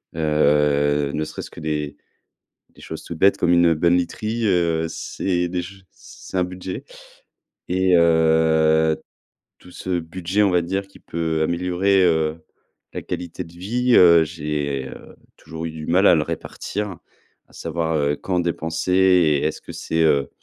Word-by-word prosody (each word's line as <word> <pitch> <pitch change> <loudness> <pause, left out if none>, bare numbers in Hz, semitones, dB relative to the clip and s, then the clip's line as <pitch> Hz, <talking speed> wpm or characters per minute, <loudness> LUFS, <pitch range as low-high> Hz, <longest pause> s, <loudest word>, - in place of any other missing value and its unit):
heu, 75 -2 +2
ne 75 - -1
serait-ce - - -7
que - - -12
des 75 -2 -3 0.7
des - - -20
choses - - -8
toutes 85 - -7
bêtes 100 +4 +4
comme 85 - +1
une 85 -1 +5
bonne 85 +3 +2
literie, 110 +6 -2
heu, 85 -4 +1
c'est 90 +1 -2
déj 90 +2 -6
c'est - - -11
un - - +3
budget. 90 +1 -7 0.8
Et 95 0 +2
heu, 80 -1 +3 0.6
tout - - -16
ce 90 0 -3
budget, 90 +4 -2
on 100 - +3
va 90 -1 +3
dire, 95 +3 -3
qui 100 - -18
peut 80 -1 -2
améliorer, 90 +3 +1
heu, 80 -2 +1 0.5
la - - -5
qualité 90 +1 -5
de 85 0 -15
vie, 120 +8 -1
heu, 85 -2 +7
j'ai, 75 -4 -3
heu, - - -12 0.2
toujours 80 +1 -8
eu 80 - -4
du 80 -1 -8
mal 95 +4 +4
à - - +6
le 75 - +1
répartir, 100 +3 -5 0.5
à - - -25
savoir, 80 -1 -3
heu, 75 -1 +1
quand 90 +3 -2
dépenser 85 0 -2
et 90 -6 +4
est-ce 80 - -3
que - - -10
c'est 80 - -2
heu, 70 -3 +2
85 Hz, 160 wpm, -21 LUFS, 80-90 Hz, 0.8 s, heu